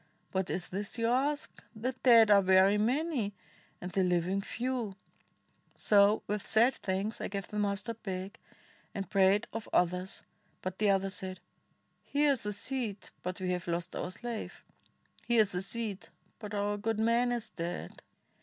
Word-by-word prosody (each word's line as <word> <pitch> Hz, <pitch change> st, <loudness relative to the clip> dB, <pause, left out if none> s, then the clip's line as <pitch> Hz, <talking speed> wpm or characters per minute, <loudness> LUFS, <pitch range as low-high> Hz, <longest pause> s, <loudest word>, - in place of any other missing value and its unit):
what 190 Hz, -1 st, -1 dB
is 180 Hz, 0 st, -3 dB
this 200 Hz, +4 st, -4 dB
you 230 Hz, -, 0 dB
ask? 275 Hz, +5 st, 0 dB
the 235 Hz, +4 st, -1 dB
dead 230 Hz, -4 st, +7 dB
Are 200 Hz, -1 st, +8 dB
very 190 Hz, +2 st, +5 dB
many, 245 Hz, -, 0 dB, 0.4 s
and 180 Hz, -, -6 dB
the 195 Hz, -, +1 dB
Hving 180 Hz, +2 st, +1 dB
few 255 Hz, +3 st, -2 dB
1 200 Hz, -3 st, -7 dB, 0.4 s
' -, -, -40 dB
So 205 Hz, +1 st, +4 dB
with 210 Hz, 0 st, -3 dB
sad 235 Hz, +4 st, +4 dB
thanks 195 Hz, +3 st, -2 dB
I -, -, -2 dB
gave 195 Hz, -1 st, -4 dB
the 210 Hz, -, -3 dB
mustard 205 Hz, +3 st, -2 dB
back, 190 Hz, 0 st, -5 dB, 0.3 s
' -, -, -31 dB
And 195 Hz, -1 st, -3 dB
prayed 195 Hz, +1 st, +4 dB
of 225 Hz, -1 st, -5 dB
others; 180 Hz, +2 st, 0 dB, 0.4 s
but 185 Hz, 0 st, -4 dB
the 210 Hz, -1 st, +3 dB
others 195 Hz, 0 st, +2 dB
said, 185 Hz, -1 st, -5 dB, 0.6 s
'Here 290 Hz, 0 st, +2 dB
is 270 Hz, -, -1 dB
the 210 Hz, -, -3 dB
seed, 220 Hz, -2 st, -4 dB
but 180 Hz, 0 st, -4 dB
we 185 Hz, -1 st, -1 dB
have 180 Hz, -1 st, -3 dB
lost 170 Hz, 0 st, -2 dB
our 180 Hz, -, -3 dB
slave!' 235 Hz, +4 st, -6 dB, 0.6 s
'Here 235 Hz, -2 st, +5 dB
is 205 Hz, -2 st, +1 dB
the 180 Hz, -, -2 dB
seed, 205 Hz, 0 st, -5 dB, 0.3 s
but 210 Hz, -2 st, -6 dB
our 205 Hz, 0 st, 0 dB
good 225 Hz, +1 st, -1 dB
man 235 Hz, +2 st, +3 dB
is 240 Hz, -2 st, -3 dB
dead!' 170 Hz, +1 st, -5 dB
205 Hz, 175 wpm, -31 LUFS, 190-230 Hz, 0.6 s, Are